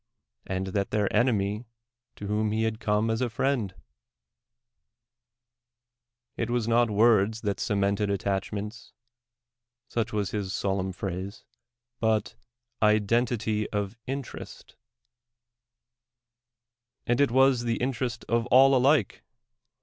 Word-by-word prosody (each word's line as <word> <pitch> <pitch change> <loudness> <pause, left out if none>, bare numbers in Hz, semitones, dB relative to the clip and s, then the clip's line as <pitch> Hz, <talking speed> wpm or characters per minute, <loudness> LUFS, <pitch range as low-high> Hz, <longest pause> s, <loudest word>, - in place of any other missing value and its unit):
and 95 0 -2
that 100 +1 -1
their 105 -1 0
enemy 105 -1 +1 0.5
to 100 - -8
whom 105 +1 0
he 110 +1 0
had 110 -1 -1
come 105 +1 +1
as 110 +2 -1
a 125 - 0
friend 115 -5 -1 1.5
— 120 0 -61
it 115 - -2
was 120 -2 0
not 120 0 +3
words 110 0 +3
that 100 -2 -2
cemented 100 0 0
attachments 100 +3 -3 0.9
(such 115 -2 -2
was 105 -2 -1
his 100 -3 -3
solemn 95 -1 -1
phrase), 95 +2 -5 0.6
but 110 -2 +1 0.5
identity 110 0 +1
of 105 0 -3
interest; 135 0 -7 2.3
and 120 +3 +2
it 140 - +4
was 130 -1 +3
the 115 -1 0
interest 125 -2 -2
of 115 0 +1
all 135 +2 +6
alike. 130 -4 +2
110 Hz, 110 wpm, -27 LUFS, 100-120 Hz, 2.3 s, all